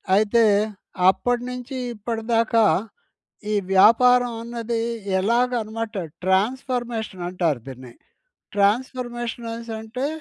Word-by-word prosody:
అయితే, 215 +3 +4 0.7
అప్పట్నుంచి 245 +4 -2 0.2
ఇప్పటిదాకా 225 +1 +1 0.9
ఈ - - +1 0.2
వ్యాపారం 245 +5 +6
అన్నది 235 0 -3 0.4
ఎలాగ 235 +5 +2
అనమాట 225 +1 -5 0.3
ట్రాన్స్‌ఫర్మేషన్ 225 0 -1
అంటారు 170 -7 0
దీన్ని. 130 -2 -10 0.6
ట్రాన్స్‌ఫర్మేషన్స్ 240 +2 -1
అనెసంటే 230 +2 -5
230 Hz, 75 wpm, -23 LUFS, 210-245 Hz, 0.9 s, వ్యాపారం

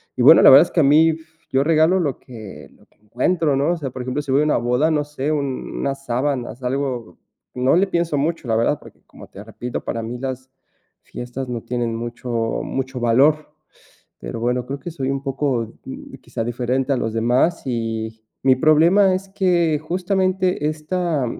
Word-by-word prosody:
y - - -2
bueno, - - +9
la - - +10
verdad 145 +6 +8
es - - -17
que 165 - +2
a - - +4
mí, 155 +3 +5 0.4
yo 135 +1 +2
regalo 165 +4 +3
lo 145 -6 -2
que 110 -6 -11
lo - - -24
que - - -36
encuentro, 145 - 0
¿no?, 140 +5 +1
o - - -3
sea, 140 -4 -4
por 125 0 -6
ejemplo, 130 +4 -2
si 140 -2 -5
voy 140 - +4
a 150 - +2
una 150 - +2
boda, 125 +7 +1
no 150 -1 +1
sé, 150 0 -3
un 140 -3 -3
unas 135 0 -3
sábanas 125 0 -2
algo, 125 - -3 0.4
no 130 +3 +2
le 195 +3 +3
pienso 170 -4 -1
mucho, 155 -1 -2
la 115 - +1
verdad, 115 +6 +1
porque, - - -16
como - - -13
te 100 - -11
repito, 120 +2 -6
para 115 -1 -3
mí 120 +2 -5
las 130 0 -6 0.5
fiestas 125 +2 -7
no 120 -2 -4
tienen 120 -2 -2
mucho 120 +2 -6 0.3
mucho 130 -1 -4
valor. 140 +6 +3 0.7
Pero - - -6
bueno, 125 +1 0
creo 140 +1 -5
que 175 - -6
soy 135 -4 -3
un 135 0 -3
poco, 135 -5 -2
mm, - - -9
quizás 115 - -4
diferente 125 +3 -1
a 135 - +2
los 115 -2 -2
demás. 125 +9 +1
Y 115 -2 -3 0.2
mi 130 -1 +4
problema 170 +7 +4
es 190 +1 -4
que 175 -5 +1
justamente, 185 +1 0
esta 155 -2 -2
135 Hz, 195 wpm, -21 LUFS, 120-155 Hz, 0.7 s, la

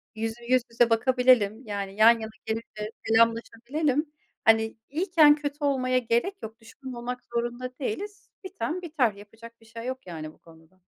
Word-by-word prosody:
Yüz 225 0 -3
yüz 255 0 +4
yüze 235 0 +3
bakabilelim, 245 -2 +3
yani, 200 -2 -5
yan 220 +2 +8
yana 220 0 -6
gelince, 220 -1 -5 0.2
selamlaşabilelim. 235 +6 +1 0.3
Hani, 220 0 +3
iyiyken, 315 -1 +5
kötü 295 0 -5
olmaya 255 -3 +1
gerek 240 - 0
yok, 220 +1 -8
düşman 255 +3 -10
olmak 245 +1 -5
zorunda 240 +2 -3
değiliz. 400 - -5
Biten 345 0 -4
biter, 295 -10 0
yapacak 225 +3 -14
bir 225 - -19
şey 230 +1 -9
yok, 260 -3 -5
yani 155 -3 -7
bu - - -25
konuda. 165 +2 -20
235 Hz, 155 wpm, -26 LUFS, 220-260 Hz, 0.3 s, yan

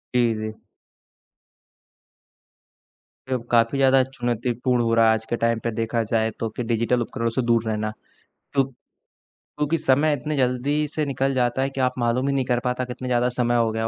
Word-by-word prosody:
जी, 120 -2 +3
जी। 110 0 -4 2.8
अब 125 -2 -1
काफ़ी 115 +3 +3
ज़्यादा 135 0 +5
चुनौतीपूर्ण 120 -1 -1
हो 115 - +1
रहा 115 0 +5
है 110 - +6
आज 110 0 -3
के 120 - -2
टाइम 115 -1 +2
पे 115 - -1
देखा 115 +1 -1
जाए 110 0 0
तो 115 - -1
कि 125 - -2
डिजिटल 115 +2 +1
उपकरणों 115 0 -2
से 120 +3 -1
दूर 115 -1 +2
रहना। 110 0 -1 0.6
तो 135 -1 +4 0.7
क्योंकि 150 +3 -2
समय 145 +1 +3
इतने 150 +2 -3
जल्दी 135 +4 +1
से 150 0 -2
निकल 135 0 0
जाता 125 0 +1
है 135 - +1
कि 135 -1 -4
आप 125 0 +2
मालूम 120 +3 +1
ही 140 - +1
नहीं 135 -2 0
कर 125 -1 +1
पाता 125 0 0
कितने 125 +1 -6
ज़्यादा 125 0 +2
समय 120 -1 0
हो 115 -1 +2
गया। 110 0 -1
125 Hz, 185 wpm, -23 LUFS, 115-130 Hz, 2.8 s, है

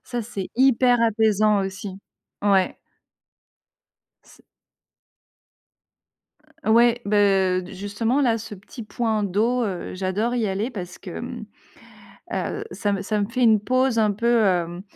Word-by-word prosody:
ça, 240 -2 -4
c'est 200 -4 -6
hyper 255 -2 +4
apaisant 215 -2 +3
aussi. 195 +1 -6 0.5
Ouais. 195 -2 +3 1.5
C - - -20 2.2
Heu, - - +2
ouais, 235 +1 +4
beh, 195 -3 +3
heu, - - -11
justement, 220 +7 -1
là 235 -4 +2
ce 220 -1 -8
petit 205 +5 -11
point 220 0 -1
d'eau, 220 +6 +1
heu, 190 -5 -4
j'adore 195 +6 -1
y 230 -3 0
aller 200 +6 -2
parce 180 -5 -7
que, - - -8
mmh, - - -7 0.9
heu, 425 - -3
ça 205 -2 -1
me 195 -1 -2
ça 210 +1 -1
me 200 - -1
fait 250 +2 -2
une 220 -3 +5
pause 255 +1 +1
un 215 -1 +3
peu, 235 +2 +2
hem, 175 -2 0
215 Hz, 140 wpm, -23 LUFS, 195-235 Hz, 2.2 s, une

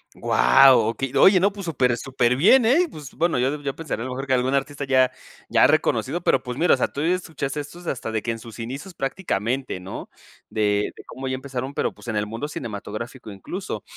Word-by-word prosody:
¡Guau! 135 -2 +6
Okey, 135 +2 -4
oye, 190 0 +7
no, 200 +2 +3
pues 200 -1 -8
super 130 -7 +1
superbién, 135 - +3
¿eh? 310 +10 +4
Pues, 150 - -10
bueno, 170 -1 +1
yo 135 +4 0
yo 140 -2 -3
pensaría 150 -8 -4
a - - -5
lo 130 - -5
mejor 135 +2 -4
que 135 - 0
algún 130 +1 +1
artista 140 +1 -1
ya 130 -1 +3 0.4
ya - - +5
reconocido, 175 - +1
pero - - +2
pues, 125 -1 -6
mira, 175 - +4
o - - -8
sea, - - +1
tú 140 - -6
ya 165 +4 +2
escuchas 155 -5 -5
estos 150 +5 -7
hasta 120 -6 -3
de 110 -1 -1
que 115 - -2
en 115 - -5
sus 115 -1 -11
inicios 135 +11 -6
prácticamente, 135 - -2
¿no? 95 - -8 0.4
De 105 -1 0
de - - -12
cómo 130 0 -7
ya 130 - -1
empezaron, 130 0 -5
pero - - -1
pues, - - -15
en 115 - -2
el 105 0 0
mundo 115 +7 -5
cinematográfico 115 -1 -7
incluso. 95 -1 -6
135 Hz, 220 wpm, -23 LUFS, 120-150 Hz, 0.4 s, oye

